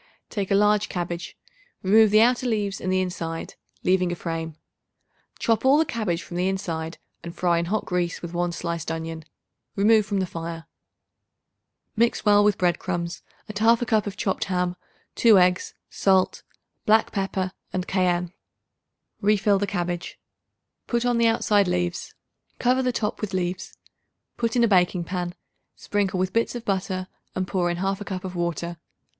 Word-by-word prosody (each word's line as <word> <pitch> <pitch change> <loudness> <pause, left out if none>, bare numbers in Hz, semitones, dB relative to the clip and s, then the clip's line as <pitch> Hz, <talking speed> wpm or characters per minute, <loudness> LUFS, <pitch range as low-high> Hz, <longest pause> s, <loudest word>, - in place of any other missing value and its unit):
Take 200 -4 -2
a 195 - +3
large 210 0 +3
cabbage; 175 -1 -4 0.5
remove 215 +3 +6
the 215 +1 +6
outer 250 +1 +2
leaves 205 -4 -1
and 185 - -1
the 185 0 +2
inside, 165 -3 -4 0.3
leaving 185 -1 +2
a - - -2
frame. 165 -2 -4 0.8
Chop 225 -1 +1
all 270 +2 +6
the 320 - +3
cabbage 200 - -2
from 175 - -7
the 180 +1 +1
inside 165 -4 -3 0.3
and 170 +1 -7
fry 175 -1 +2
in 170 - -1
hot 210 +5 -1
grease 180 -2 -1
with 170 0 -7
1 175 0 0
sliced 170 -1 -4
onion. 160 -1 -5 0.5
Remove 215 +2 +5
from 200 -2 0
the 190 - +1
fire. 165 -1 -6 1.3
Mix 230 +1 +1
well 205 0 +6
with 205 -1 +3
bread 175 -1 +1
crumbs 175 -1 -3 0.3
and 215 - -8
1/2 230 +3 +4
cup 215 -2 +1
of 200 0 -5
chopped 195 -3 -1
ham, 180 -2 -1 0.4
2 225 -4 +6
eggs, 180 -1 +2
salt, 190 -1 +2 0.5
black 220 +1 +4
pepper 195 -2 -2 0.2
and 185 0 -3
cayenne. 180 -2 +1 0.9
Refill 205 -1 +3
the 205 - -1
cabbage; 175 -2 -3 0.7
put 235 0 0
on 245 -1 +2
the 230 - +5
outside 205 -3 +3
leaves; 175 -1 -2 0.4
cover 255 +1 +2
the 255 -1 +1
top 215 -3 -2
with 205 -3 -3
leaves. 185 +1 -3 0.6
Put 230 0 -1
in 240 - +4
a - - +5
baking 180 -3 +3
pan; 175 0 -4 0.4
sprinkle 200 -2 -1
with 185 0 -1
bits 230 +1 +1
of 240 - -6
butter 185 -1 -1 0.3
and 185 0 -1
pour 180 -3 0
in 175 - -2
1/2 195 +2 -1
cup 185 -1 -4
of 185 -1 -6
water. 170 0 -2
185 Hz, 170 wpm, -25 LUFS, 175-210 Hz, 1.3 s, remove